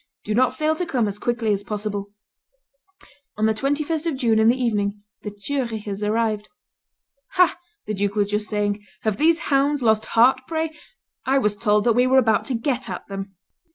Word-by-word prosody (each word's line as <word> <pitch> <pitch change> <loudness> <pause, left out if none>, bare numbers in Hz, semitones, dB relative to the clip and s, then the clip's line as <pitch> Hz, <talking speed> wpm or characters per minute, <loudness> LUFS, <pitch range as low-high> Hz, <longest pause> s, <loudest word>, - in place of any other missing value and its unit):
Do 215 - -1
not 250 +3 +2
fail 310 0 +1
to 360 - -1
come 245 -7 +1
as 205 0 -5
quickly 235 -2 0
as 200 0 -2
possible." 205 -1 -4 1.3
On 215 - +1
the 220 - +3
21st 295 +7 -1
of 305 -5 -1
June, 230 -4 +2
in 220 - +4
the 245 +3 +3
evening, 205 -4 -1 0.2
the 210 - -5
Zurichers 210 -2 -4
arrived. 215 0 0 0.8
"Ha!" 360 -2 +4 0.3
the 215 - -3
duke 200 0 -1
was 205 -1 +2
just 210 +1 -1
saying, 205 -1 -1 0.2
"have 215 -2 -1
these 330 +4 +2
hounds 280 0 +2
lost 220 -1 +3
heart, 255 +3 +6
pray? 320 -1 -2 0.6
I 270 +1 +3
was 210 -6 +1
told 210 -1 +2
that 235 - +3
we 250 +2 +3
were 260 +1 +4
about 225 -4 +3
to 260 - -2
get 250 +2 -2
at - - -6
them." 195 0 -6
220 Hz, 190 wpm, -23 LUFS, 210-265 Hz, 1.3 s, heart